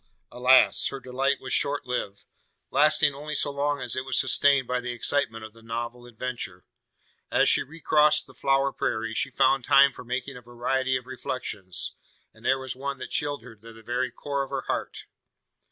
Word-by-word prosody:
Alas! 130 +1 +5
her 135 - -5
delight 135 +2 -1
was - - -5
short 145 0 0
lived: 105 -5 -4 0.5
lasting 150 0 +4
only 150 +2 -6
so 145 - +1
long 145 +1 -1
as 125 -2 -3
it 130 - -2
was 130 -1 +1
sustained 140 -2 +3
by 125 0 0
the 125 0 -4
excitement 120 -2 0
of 110 0 -10
the 115 - -15
novel 120 +2 -5
adventure. 115 -6 -5 0.6
As - - +3
she - - +6
recrossed 150 0 +2
the - - -17
flower 135 0 +1
prairie, 110 0 -2
she 125 - -1
found 135 0 +2
time 140 +2 +6
for 125 - -10
making 125 +2 -4
a - - -11
variety 130 +2 -1
of 125 - -10
reflections; 125 -7 -4 0.4
and - - -20
there 135 - +3
was 130 -1 -6
one 140 +1 -4
that - - -8
chilled 145 -4 -1
her 115 -2 -12
to 115 +2 -14
the 115 0 -15
very 125 +3 -1
core 140 +3 -3
of 135 - -4
her 135 -1 -2
heart. - - -4
130 Hz, 190 wpm, -26 LUFS, 120-140 Hz, 0.6 s, she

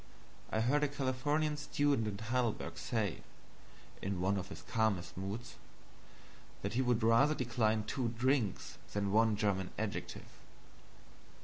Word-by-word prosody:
I 110 - +1
heard 145 +6 +3
a - - +4
Californian 145 +2 0
student 145 -5 +1
in 100 -2 -3
Heidelberg 120 +1 -1
say, 110 - -1 0.8
in 95 -1 -2
one 95 +3 +2
of 95 -1 -3
his - - -9
calmest 110 -6 0
moods, 100 +6 -5 1.1
that 100 +2 -2
he 125 - +2
would 125 -3 +2
rather 115 +7 +5
decline 110 -4 +1
two 120 +3 -1
drinks 120 -2 0
than 100 -1 0
one 110 +1 +4
German 100 -3 0
adjective. 110 -1 -4
115 Hz, 130 wpm, -34 LUFS, 100-130 Hz, 1.1 s, rather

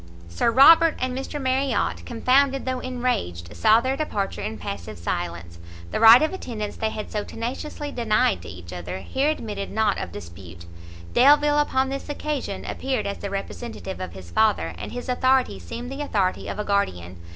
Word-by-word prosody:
Sir 85 - +1
Robert 320 +6 +7
and 255 0 -2
Mr 270 +3 -4
Marriot, 265 -1 0
confounded 265 +3 +2
though 255 -1 -1
enraged, 165 - -3
saw 220 +1 +5
their 260 +2 -1
departure 210 -10 -3
in 215 +2 -4
passive 200 - -6
silence; 85 0 -4 0.3
the - - -1
right 230 +5 +9
of 315 - 0
attendance 220 - -5
they 220 - 0
had 215 -1 -6
so 210 -1 -2
tenaciously 270 +7 -5
denied 215 - +1
to - - -10
each 90 0 -10
other, 90 +1 -5
here 270 - 0
admitted 210 -9 -4
not 220 -2 +1
of 85 - -5
dispute; 85 -1 -10 0.5
Delvile 295 +3 +5
upon 265 -2 +1
this 275 +2 -5
occasion, 290 -8 -4
appeared 265 -1 -2
as 200 - -4
the 200 - -4
representative 195 0 -6
of 90 -2 -6
his 90 -2 -11
father, 85 -4 +2
and 85 - -7
his 245 +1 -6
authority 255 - +2
seemed 240 - -7
the 275 +2 -5
authority 200 -10 -1
of - - -4
a 210 - -3
guardian. 90 - -1
220 Hz, 175 wpm, -24 LUFS, -, 0.5 s, right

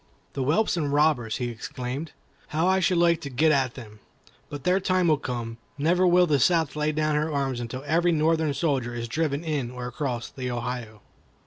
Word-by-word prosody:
"The 140 - -3
whelps 165 +9 +1
and 145 -4 -1
robbers!" 145 -7 +2
he 125 -2 -2
exclaimed; 125 +6 -5 0.4
"how 160 +3 0
I 190 +1 +3
should 180 0 +2
like 170 -1 +3
to 140 - -5
get 150 +5 +3
at 135 -4 +1
them! 110 -4 -11 0.5
But 145 -2 -7
their 180 +1 +3
time 185 -1 +1
will 155 -2 +3
come. 120 -4 -5 0.2
Never 175 +5 +3
will 180 0 +5
the 150 -4 +2
South 165 +1 +2
lay 150 0 0
down 155 0 0
her 155 +1 0
arms 135 -3 -1
until 120 +3 -5
every 170 +3 +2
Northern 160 -2 +1
soldier 135 -7 -1
is 120 0 -4
driven 150 +3 -1
in 150 -7 -2
or 125 0 -7
across 125 -1 -4
the 125 -1 -5
Ohio." 120 -3 -5
145 Hz, 200 wpm, -26 LUFS, 125-160 Hz, 0.5 s, will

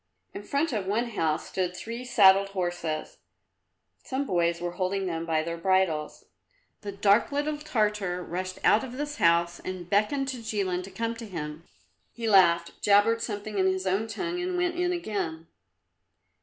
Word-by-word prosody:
In - - -6
front 280 +7 -1
of 200 -4 -2
one 230 +4 0
house 160 -7 -1
stood 180 -1 -2
three 230 +2 -6
saddled 195 -5 +5
horses; 175 -3 -3 0.9
some 270 +2 -2
boys 170 -5 +1
were 175 0 -3
holding 190 +2 -1
them 165 -2 -3
by 160 -1 +1
their 170 +1 -4
bridles. 180 -4 0 0.6
The 205 - -5
dark 200 +4 +3
little 295 +1 -1
Tartar 210 -10 -1
rushed 185 +2 -4
out 215 - +5
of 255 -2 -7
this 295 +2 -4
house 170 +1 +3
and 185 -2 -6
beckoned 215 +8 +1
to 260 - -4
Jilin 200 -5 -1
to - - -10
come 230 +4 -3
to 230 -1 -8
him. 160 -3 -6 0.5
He 230 -1 -3
laughed, 185 -5 +4
jabbered 210 +3 +4
something 205 -2 -4
in 190 - +3
his 190 0 0
own 195 +4 0
tongue 350 +9 -3
and 360 0 -2
went 355 0 +1
in 355 +1 0
again. 195 - -3
200 Hz, 170 wpm, -27 LUFS, 175-230 Hz, 0.9 s, saddled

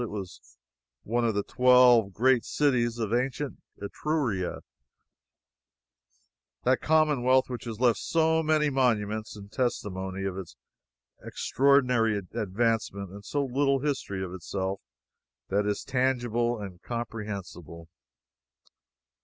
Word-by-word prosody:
It 120 - -3
was 95 - -9 0.5
one 120 +2 0
of 115 -3 0
the 100 - 0
twelve 125 -4 +5
great 125 +4 +3
cities 120 -5 +1
of 110 -2 -2
ancient 130 +3 -2 0.2
Etruria, 110 - -2 2.0
that 130 +1 +2
commonwealth 135 -5 +3
which 125 -2 -6
has 115 -2 -6
left 120 -4 +3
so 160 0 +2
many 155 -1 +2
monuments 110 -5 0
in 100 0 -11
testimony 95 -6 -3
of 95 -1 -3
its 80 -10 -10 0.7
extraordinary 125 -5 +2
advancement, 105 0 -2
and 100 +1 -10
so 140 +6 -1
little 135 +1 +1
history 130 -10 -2
of 90 -1 -6
itself 95 +2 -4 0.7
that 100 +1 +1
is 105 -1 -1
tangible 120 -2 0
and 95 -4 -8
comprehensible. 100 -8 -6
115 Hz, 110 wpm, -27 LUFS, 100-130 Hz, 2.0 s, twelve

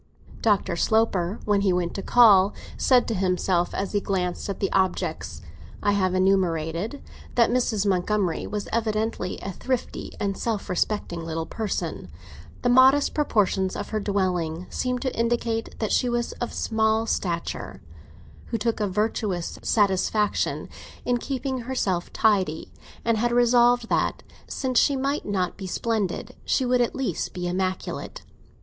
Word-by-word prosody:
Dr. 205 -5 +2
Sloper, 200 -1 +1
when 205 -1 +2
he 200 -2 +3
went 180 -1 0
to 195 - -4
call, 205 -4 +6 0.2
said 255 -2 +3
to 230 - -1
himself, 185 -2 +1
as 195 0 -2
he 205 - 0
glanced 180 -1 -2
at 200 - -4
the 195 - -1
objects 190 -1 -1 0.4
I 205 - +3
have 185 -2 +1
enumerated, 185 - 0 0.3
that 235 -1 +4
Mrs. 235 -5 +1
Montgomery 190 -1 0
was 210 -1 -4
evidently 220 -3 -1
a 195 - -3
thrifty 255 +6 -3
and 200 -1 -1
self 220 -3 -3
respecting 180 -3 -1
little 165 0 -3
person—the 95 - -5
modest 260 +3 +5
proportions 205 -9 +1
of 205 - -5
her 215 - -1
dwelling 180 -5 -1
seemed 250 -1 -2
to 260 - -2
indicate 230 -1 -1
that 215 - -2
she 250 - +2
was 240 0 -1
of 240 - -2
small 220 0 +1
stature—who 180 +4 -5
took 230 +1 -1
a 210 - +1
virtuous 200 -3 -2
satisfaction 205 0 +1 0.4
in 245 -1 +1
keeping 265 0 -3
herself 230 -8 -2
tidy, 190 -8 +1 0.3
and 230 -2 +2
had 240 +1 +1
resolved 240 0 +4
that, - - 0 0.2
since 255 -3 +1
she 285 - +3
might 275 +2 -1
not 185 -3 -1
be 190 - -6
splendid, 215 -1 -2
she 260 - +1
would 250 0 +3
at 240 - 0
least 245 -11 -2
be 180 -1 -3
immaculate. 185 +1 -3
205 Hz, 145 wpm, -25 LUFS, 185-235 Hz, 0.4 s, call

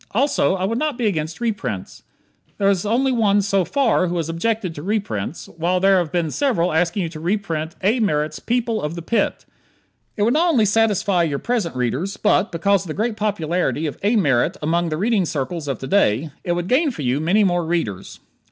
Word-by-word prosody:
Also, 270 -5 +2
I 190 0 -1
would 230 +4 -1
not 300 -4 -1
be 245 - -1
against 160 -5 -2
reprints. 205 - -4 0.6
There 200 0 +3
is 195 +1 -1
only 260 +5 +2
one 205 -4 +2
so 195 -1 +1
far 235 -4 +1
who 175 +1 -2
has 165 -1 -2
objected 185 +2 -1
to 145 - -8
reprints, 170 - -3
while 175 +3 -1
there 195 0 +4
have 170 -3 -2
been 170 -4 -1
several 210 - +1
asking 175 +4 +1
you 165 - -3
to 160 -1 -9
reprint 165 -3 -2
A. 220 +6 +2
Merritt's 155 -7 0
"People 235 -2 -1
of 150 +2 -3
the 170 - -6
Pit." 230 +7 -1 0.7
It 205 - +1
would 235 +3 +3
not 340 +3 +3
only 245 -10 +3
satisfy 205 -3 +2
your 155 -4 0
present 220 - -2
readers, 130 - -2
but, 210 0 +2
because 195 +3 +2
of - - -11
the 155 - -5
great 225 +1 -1
popularity 180 -6 -1
of 150 - -4
A. 210 +4 +2
Merritt 140 - +2
among 170 +2 0
the 155 - -2
reading 210 +1 +1
circles 155 0 -3
of 135 -4 -2
to 135 - -7
day, 150 - +2
it 175 - 0
would 175 0 -2
gain 290 - +3
for 170 - -6
you 130 +2 +1
many 185 +7 +3
more 175 -3 +1
readers. 160 - -3
185 Hz, 210 wpm, -21 LUFS, 160-215 Hz, 0.7 s, there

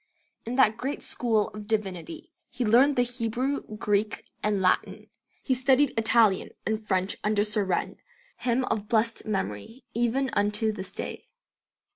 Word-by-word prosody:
In 240 - -2
that 225 -5 +4
great 270 +4 -3
school 220 -4 0
of 210 -1 -9
divinity 220 - -3 0.2
he 245 -1 -3
learned 255 +6 +5
the 245 - +4
Hebrew, 245 +3 -2 0.2
Greek, 210 +1 0 0.2
and 210 -1 +1
Latin; 185 -1 0 0.3
he 265 - +1
studied 260 +2 +3
Italian, 220 -3 +3 0.2
and 220 0 -1
French 190 -2 0
under 210 -1 +2
Surenne, 210 -4 -1 0.4
him 255 +1 0
of 210 -3 -2
blessed 230 -1 +1
memory 195 - -4
even 240 +3 0
unto 210 +2 +1
this 195 -3 -6
day. - - -6
220 Hz, 140 wpm, -27 LUFS, 210-250 Hz, 0.4 s, learned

